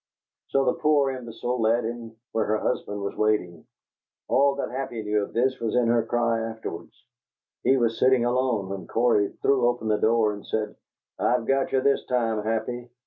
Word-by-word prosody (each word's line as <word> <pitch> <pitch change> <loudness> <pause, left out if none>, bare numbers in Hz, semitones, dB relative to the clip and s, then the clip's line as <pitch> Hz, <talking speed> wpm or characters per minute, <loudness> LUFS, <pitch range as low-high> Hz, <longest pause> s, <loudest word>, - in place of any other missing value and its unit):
So 135 0 +1
the 125 - +3
poor 145 -3 +3
imbecile 120 -1 -4
led 115 +2 +2
him 115 0 -5
to 110 - -22 0.2
where 110 - 0
her 110 +1 +1
husband 105 -2 -2
was 100 - -4
waiting. 90 -6 -1 0.6
All 140 +1 +3
that 140 - -4
Happy 125 -3 -4
knew 105 0 +1
of 100 - -5
this 130 +2 +1
was 115 -1 -2
in 120 -2 +3
her 115 -1 +3
cry 115 0 0
afterwards. 110 -7 -7 0.6
He 135 - +3
was 115 -2 0
sitting 130 -2 +4
alone, 120 -5 0
when 95 -3 -6
Cory 115 -4 +2
threw 130 -3 +3
open 120 -2 -1
the 105 - +3
door 110 -1 +3
and 105 - -9
said, 110 -1 -3 0.4
'I've 120 -1 +1
got 135 +1 +1
you 130 - +2
this 140 +1 +2
time, 115 -4 0
Happy!' 115 +3 -3
115 Hz, 190 wpm, -25 LUFS, 110-125 Hz, 0.6 s, sitting